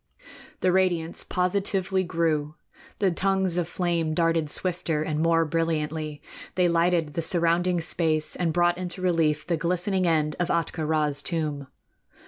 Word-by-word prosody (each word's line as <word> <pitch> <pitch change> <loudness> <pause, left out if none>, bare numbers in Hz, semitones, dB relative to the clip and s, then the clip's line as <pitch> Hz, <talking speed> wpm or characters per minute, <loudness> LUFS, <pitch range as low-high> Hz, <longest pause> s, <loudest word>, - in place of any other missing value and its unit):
The 185 - +3
radiance 175 -3 +1
positively 190 +1 0
grew; 160 -4 -1 0.4
the 195 -3 +2
tongues 190 0 +1
of 170 - -1
flame 170 -3 -1
darted 165 -2 +1
swifter 170 -3 0
and 155 -1 -2
more 165 0 +3
brilliantly; 155 -2 -2 0.3
they 180 -1 +3
lighted 170 -2 +1
the 165 - -1
surrounding 170 +1 +1
space 160 -2 0
and 170 -2 0
brought 175 +1 +2
into 185 0 -5
relief 160 -4 +1
the 170 -1 0
glistening 180 +3 0
end 155 -2 +1
of 175 - +1
Ahtka 165 -2 -1
Rā's 150 -2 0
tomb. 150 -4 -2
170 Hz, 140 wpm, -26 LUFS, 155-180 Hz, 0.4 s, The